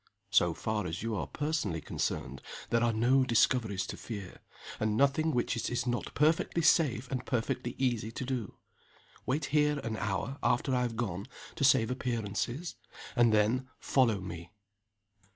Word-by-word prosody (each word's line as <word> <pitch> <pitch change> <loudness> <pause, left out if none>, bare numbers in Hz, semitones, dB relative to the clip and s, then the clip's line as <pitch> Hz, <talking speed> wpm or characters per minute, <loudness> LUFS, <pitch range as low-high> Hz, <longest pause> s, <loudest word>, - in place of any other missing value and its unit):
So 85 -2 +4
far 110 -4 -2
as 85 +5 -4
you 115 -1 -1
are - - -2
personally 145 - -2
concerned 70 -3 -3 0.3
there 115 0 +3
are 120 - +3
no 125 +4 +3
discoveries 115 -5 +2
to - - -6
fear 100 -5 -7 0.4
and 110 0 +1
nothing 140 +4 +3
which 120 -3 0
it 115 -2 -2
is 120 0 -1
not 120 -1 -2
perfectly 160 +2 +2
safe 135 -7 +3
and 130 -2 -2
perfectly 120 0 -2
easy 120 -4 0
to 130 - -4
do. 125 -6 -3 0.7
Wait 140 +5 0
here 150 -1 +3
an 110 -1 -3
hour 105 +7 -2
after 130 +2 +1
I 125 - +2
have 120 -2 -1
gone 100 -3 -3 0.3
to 160 - -3
save 125 -4 +5
appearances; 120 - -2 0.4
and 120 -2 +5
then 110 +5 +2
follow 120 -7 +2
me." 85 -2 -7
120 Hz, 160 wpm, -31 LUFS, 105-130 Hz, 0.7 s, save